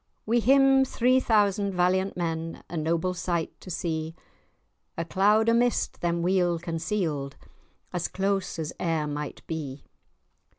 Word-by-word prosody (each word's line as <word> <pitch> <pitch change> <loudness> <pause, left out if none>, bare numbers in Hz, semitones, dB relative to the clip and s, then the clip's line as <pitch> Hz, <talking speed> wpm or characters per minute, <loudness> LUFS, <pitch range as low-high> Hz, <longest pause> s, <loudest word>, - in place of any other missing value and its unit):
Wi' 235 +2 +2
him 270 +2 +5
three 255 0 +2
thousand 205 -4 +2
valiant 185 +2 +1
men, 165 -1 -3
A - - -5
noble 165 +3 0
sight 175 -2 -2
to - - -10
see! 160 -2 -3 0.8
A 165 - -2
cloud 210 +6 +3
o' 230 - +5
mist 240 +1 +1
them 170 0 0
weel 180 -1 +2
conceal'd, 160 -4 -2 0.6
As 175 -1 -1
close 195 -1 -1
as 160 -2 -4
e'er 165 -3 0
might 150 -1 -5
be. 145 -4 -5
175 Hz, 135 wpm, -27 LUFS, 160-205 Hz, 0.8 s, him